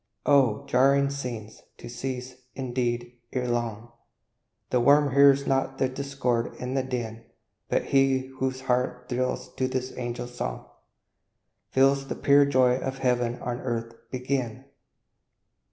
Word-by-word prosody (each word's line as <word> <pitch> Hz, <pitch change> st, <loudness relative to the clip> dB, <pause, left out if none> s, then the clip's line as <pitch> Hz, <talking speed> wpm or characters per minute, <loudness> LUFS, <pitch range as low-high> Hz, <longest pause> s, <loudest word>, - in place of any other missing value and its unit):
Oh, 140 Hz, -3 st, +3 dB
jarring 140 Hz, +1 st, +3 dB
scenes! 120 Hz, -6 st, -6 dB, 0.2 s
to -, -, -10 dB
cease, 125 Hz, +1 st, -5 dB, 0.2 s
indeed, 120 Hz, -2 st, -2 dB
ere 125 Hz, -1 st, -1 dB
long; 120 Hz, -1 st, -2 dB, 0.8 s
The 125 Hz, -, +3 dB
worm 140 Hz, +2 st, +4 dB
hears 140 Hz, 0 st, +6 dB
not 135 Hz, 0 st, 0 dB
the 130 Hz, -, +2 dB
discord 130 Hz, -3 st, -2 dB
and 125 Hz, +1 st, -3 dB
the 135 Hz, -, +2 dB
din; 120 Hz, -3 st, -4 dB, 0.5 s
But -, -, +1 dB
he 135 Hz, -1 st, +3 dB
whose 130 Hz, 0 st, -1 dB
heart 125 Hz, -1 st, -1 dB
thrills 125 Hz, +1 st, -2 dB
to 130 Hz, -, +1 dB
this 130 Hz, 0 st, -3 dB
angel 120 Hz, -1 st, -4 dB
song, -, -, -5 dB, 1.0 s
Feels 135 Hz, +1 st, +3 dB
the -, -, -3 dB
pure 140 Hz, 0 st, +5 dB
joy 130 Hz, -2 st, +3 dB
of 135 Hz, 0 st, -4 dB
heaven 125 Hz, -2 st, 0 dB
on 120 Hz, 0 st, -3 dB
earth 115 Hz, -2 st, -3 dB, 0.2 s
begin! 130 Hz, -1 st, -3 dB
130 Hz, 135 wpm, -26 LUFS, 120-135 Hz, 1.0 s, hears